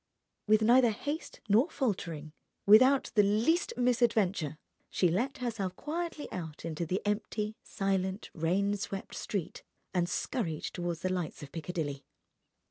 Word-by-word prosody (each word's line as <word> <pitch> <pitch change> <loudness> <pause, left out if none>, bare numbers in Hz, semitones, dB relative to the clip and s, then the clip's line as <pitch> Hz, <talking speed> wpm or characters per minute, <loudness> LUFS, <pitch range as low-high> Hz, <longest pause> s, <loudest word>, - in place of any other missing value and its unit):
With 215 +1 +5
neither 240 +2 +6
haste 285 +9 -4
nor 225 - +4
faltering, 170 - -2 0.3
without 255 +7 +6
the 210 - +6
least 220 - +2
misadventure, 220 - +2 0.3
she 180 - +2
let 240 +11 0
herself 220 -7 -3
quietly 325 - -4
out 160 -3 -6
into 165 0 -3
the 185 +4 -1
empty, 210 +1 -1
silent, 195 0 -2
rain 190 +5 +1
swept 195 0 -5
street, 200 -7 -4 0.3
and 175 -1 +1
scurried 175 - -2
toward 175 -1 -3
the 185 0 0
lights 175 -4 -3
of 140 - -10
Piccadilly. 155 -4 -4
200 Hz, 130 wpm, -31 LUFS, 175-240 Hz, 0.3 s, neither